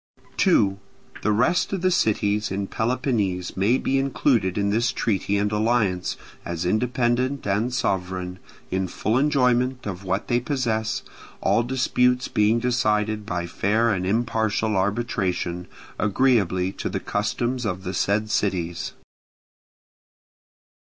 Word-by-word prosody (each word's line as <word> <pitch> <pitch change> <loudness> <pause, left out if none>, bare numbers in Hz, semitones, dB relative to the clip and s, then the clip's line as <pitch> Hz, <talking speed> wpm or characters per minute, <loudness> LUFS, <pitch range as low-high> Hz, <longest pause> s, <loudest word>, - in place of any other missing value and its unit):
2. 100 - +3 0.4
The 105 - +1
rest 125 +11 +2
of 190 -2 -2
the 185 - +3
cities 105 - +1
in 100 +1 -2
Peloponnese 110 -6 -1
may 105 +7 +3
be 135 +1 0
included 120 -8 +1
in 100 0 +1
this 120 +4 +2
treaty 100 -4 0
and 105 0 0
alliance, 105 -4 +1 0.3
as 85 0 -3
independent 125 +6 0
and 105 +5 0
sovereign, 90 -5 -2 0.3
in 95 0 0
full 110 +4 -1
enjoyment 130 -2 +2
of 95 -2 -5
what 95 +2 -2
they 120 - +2
possess, 115 -5 -1 0.4
all - - +2
disputes 125 0 +1
being 105 +2 +2
decided 110 -3 0
by 90 -2 -2
fair 110 +6 +1
and 90 -1 -2
impartial 110 -1 0
arbitration, 95 -3 -1 0.3
agreeably 100 -5 +2
to - - -4
the - - -2
customs 120 +5 -1
of 95 -3 -3
the 90 - -4
said 105 +4 0
cities. 85 -4 -1
110 Hz, 125 wpm, -24 LUFS, 95-125 Hz, 0.4 s, 2